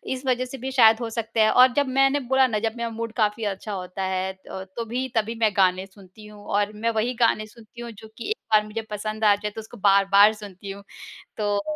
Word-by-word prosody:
इस 260 - -10
वजह 255 -1 +1
से 265 +2 -8
भी 265 +2 -5
शायद 225 -3 +5
हो 230 - -3
सकता 225 0 -2
है 215 - +4
और 250 0 +6
जब 285 -2 +1
मैंने 270 +2 +2
बोला 265 0 +2
ना 215 -4 -1
जब 225 0 -2
मेरा 235 0 -3
मूड 230 0 -6
काफ़ी 215 0 0
अच्छा 205 +1 -4
होता 185 0 -5
है, 190 0 -2 0.2
तोभी 230 +7 -5
तभी 225 +1 0
मैं 220 -2 +3
गाने 185 0 +3
सुनती 195 +1 -17
हूँ 210 -1 -14
और 205 +1 0
मैं 230 +2 -1
वही 225 +3 -1
गाने 225 -2 +2
सुनती 230 +2 -14
हूँ 235 - -7
जो 220 0 -13
कि 235 - -6
एक 435 - -1 0.2
बार 215 - +6
मुझे 220 +1 -5
पसंद 215 +1 -4
आ 205 -1 +6
जाए, 210 +1 -5
तो 220 - -7
उसको 225 +2 -13
बार-बार 200 +1 +5
सुनती 200 -2 -9
हूँ, 200 0 -10 0.5
तो 205 -1 0
215 Hz, 235 wpm, -24 LUFS, 205-235 Hz, 0.5 s, और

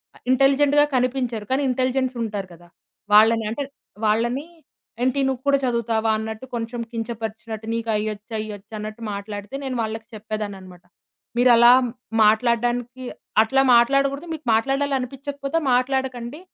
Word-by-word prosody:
అహ్, - - -19
ఇంటెలిజెంట్‌గా 280 +2 +4
కనిపించరు. 250 -3 -1
కానీ 265 +2 +2
ఇంటెలిజెన్స్ 255 0 0
ఉంటారు 205 -3 -4
కదా! 175 +1 -17 0.5
వాళ్ళని 225 +1 +6
అంటే 230 +6 -3 0.4
వాళ్ళని, 235 +6 +1 0.6
ఏంటి 260 +2 +1
నువ్వు 260 -2 -2
కూడా 280 0 +5
చదువుతావా? 230 -2 0
అన్నట్టు 220 +2 -5
కొంచెం 235 +1 -4
కించపరిచినట్టు 225 -1 -5
నీకు 230 0 -3
అయ్యొచ్చా, 210 +1 -4
ఇయ్యొచ్చా 210 0 -10
అన్నట్టు 215 +2 -7
మాట్లాడితే 205 +4 -6
నేను 265 -2 -3
వాళ్ళకి 220 0 -5
చెప్పేదానన్నమాట. 205 -4 -6 0.5
మీరలా 240 -1 +7 0.5
మాట్లాడడానికి 240 +3 +1 0.4
అట్లా 270 +4 +2
మాట్లాడకూడదు, 275 +5 +2
మీకు 310 -3 -8
మాట్లాడాలనిపిచ్చకపోతే 275 +3 -1 0.2
మాట్లాడకండి. 255 +1 -1
235 Hz, 115 wpm, -23 LUFS, 220-265 Hz, 0.6 s, మీరలా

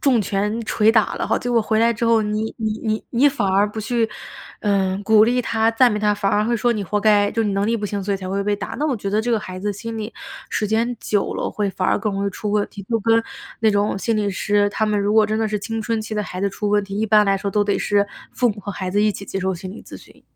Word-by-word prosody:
重 250 -6 +3
拳 210 +4 -1
捶 215 0 +3
打 220 -2 +2
了 - - -2
哈， - - +1
结 245 - -3
果 235 -1 +3
回 220 0 +1
来 230 +1 +4
之 230 +1 -3
后， 230 -1 +4
你 215 +1 -2
你 220 -1 -2
你 215 0 -1
你 260 +4 +4
反 270 -7 -2
而 200 +2 +3
不 220 +1 -6
去， 230 +1 0 0.5
呃， 195 -2 +1
鼓 215 +1 +5
励 245 +2 +1
他、 225 -1 +1
赞 245 +2 +5
美 210 - -1
他， 210 0 +2
反 200 -1 0
而 210 +1 +2
会 235 +1 +1
说 240 +2 +2
你 210 -3 -3
活 210 +4 -1
该， 205 -1 +4
就 225 - -1
你 210 - 0
能 195 +1 0
力 230 +1 +1
不 210 - -5
行， 205 0 -2
所 200 0 0
以 - - -1
才 185 -1 -7
会 195 +1 -1
被 205 - +1
打。 205 - -6
那 300 - 0
我 265 -5 0
觉 200 -1 -4
得 215 +1 +2
这 240 +1 -1
个 220 - +1
孩 185 -3 -7
子 200 - -6
的 205 - +1
心 225 +2 -6
里， 215 +1 -6 0.3
时 - - -1
间 230 +2 0
久 205 -2 -1
了 - - -2
会 205 -1 -1
反 185 -1 -1
而 - - +2
更 210 -3 -2
容 200 +1 -2
易 200 - 0
出 210 +1 -5
问 210 -1 +2
题。 200 - -10
就 230 -1 0
跟 225 +2 +3 0.4
那 220 - +3
种 205 -1 +1
心 225 +2 0
理 205 -1 0
师， 205 +1 +1
他 215 +1 -1
们 210 -1 +1
如 205 +1 +1
果 220 -1 +5
真 215 0 -1
的 220 -1 0
是 210 0 -1
青 225 +2 -4
春 225 0 -1
期 215 0 -5
的 210 - 0
孩 185 -2 -6
子 200 - +1
出 205 +2 -3
问 205 0 +2
题， 195 0 -6
一 220 - 0
般 210 -1 +4
来 195 0 +3
说 200 +1 -3
都 210 0 +1
得 205 - +1
是 205 -1 +1 0.3
父 245 - +2
母 205 -1 -4
和 205 - -6
孩 185 -1 -4
子 205 +3 +1
一 215 - +3
起 200 - -7
接 195 - -4
受 190 +1 0
心 185 +1 -7
理 - - -11
咨 - - -10
询。 - - -18
210 Hz, 335 characters per minute, -21 LUFS, 200-225 Hz, 0.5 s, 鼓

